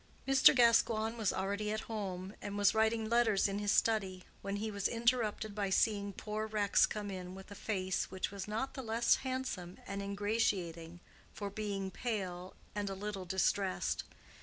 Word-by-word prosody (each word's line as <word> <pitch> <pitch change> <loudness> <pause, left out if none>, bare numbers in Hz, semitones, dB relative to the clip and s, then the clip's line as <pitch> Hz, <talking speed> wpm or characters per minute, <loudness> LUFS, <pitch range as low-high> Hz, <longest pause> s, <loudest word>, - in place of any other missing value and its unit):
Mr. 270 +1 +7
Gascoigne 230 -2 +4
was 220 -4 +1
already 200 +2 -2
at 215 0 -1
home, 195 -3 -5
and 205 0 -4
was 205 -1 +4
writing 220 0 +2
letters 225 -4 +3
in 200 +1 -2
his 205 -1 +1
study, 195 -6 +1 0.2
when 200 0 -3
he 215 +2 -2
was 200 -1 0
interrupted 230 -3 0
by 200 -1 -1
seeing 200 0 +2
poor 215 +2 -4
Rex 210 -2 +3
come 210 -1 -4
in 185 -1 -6
with 190 +1 -11
a - - -5
face 190 -3 -2
which 190 0 -3
was 200 -1 -6
not 225 +6 -2
the 265 - -5
less 230 0 +3
handsome 255 -9 -4
and 200 0 -4
ingratiating 200 -5 -1 0.3
for 200 -1 -4
being 200 -2 -3
pale 185 -6 -4 0.2
and 205 -1 -2
a 195 - -4
little 195 -1 -5
distressed. 190 +1 0
205 Hz, 170 wpm, -34 LUFS, 190-220 Hz, 0.3 s, Mr